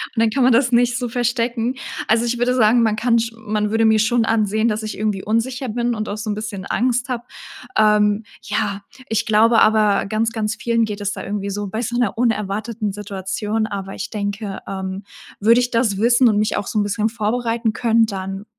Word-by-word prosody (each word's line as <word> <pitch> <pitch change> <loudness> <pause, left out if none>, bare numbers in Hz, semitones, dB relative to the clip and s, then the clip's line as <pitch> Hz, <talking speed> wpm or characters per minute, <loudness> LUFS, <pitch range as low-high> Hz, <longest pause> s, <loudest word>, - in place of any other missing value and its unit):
und 225 - +1
dann 230 - +4
kann 260 +4 +1
man 250 0 +5
das 240 +1 +3
nicht 245 0 +3
so 245 -2 -3
verstecken. 240 0 -1 0.3
Also 225 +2 +3
ich 240 0 -1
würde 245 +1 +1
sagen, 230 0 +4
man 220 -2 +2
kann 230 +1 +2
sch 230 0 -2
man 210 -1 -2
würde 225 +1 +2
mir 220 0 +4
schon 230 +1 +2
ansehen, 220 0 +1
dass 220 -1 -1
ich 215 - -5
irgendwie 210 -2 -1
unsicher 245 +4 -1
bin 240 +2 -1
und 215 0 -4
auch 205 - -4
so 215 0 -5
'n 205 - -1
bisschen 210 -3 -6
Angst 245 +3 0
habe. 245 -2 -3 0.5
Ähm, 210 0 +3 0.2
ja, 200 -1 -2 0.3
ich 225 0 0
glaube 225 +1 +4
aber 215 -2 +3
ganz 220 +2 -1
ganz 220 -1 -2
vielen 230 -1 +1
geht 210 -1 -6
es 205 0 -1
da - - -7
irgendwie 200 0 -3
so 205 +1 -3
bei 220 +4 -3
so 240 0 -3
'ner 240 -5 0
unerwarteten 215 -1 -1
Situation, 205 +2 -3
aber 195 -2 -5
ich - - -5
denke, 205 -1 -4
ähm, 190 0 -5 0.4
würde 230 +4 +5
ich 245 0 -1
das 230 -4 +1
wissen 240 +4 +4
und 210 - +1
mich 210 - 0
auch 205 - -3
so 215 - -1
'n - - +2
bisschen 210 +2 0
vorbereiten 230 +1 -1
können, 230 -1 +3
dann 195 -1 -5
220 Hz, 215 wpm, -20 LUFS, 210-235 Hz, 0.5 s, man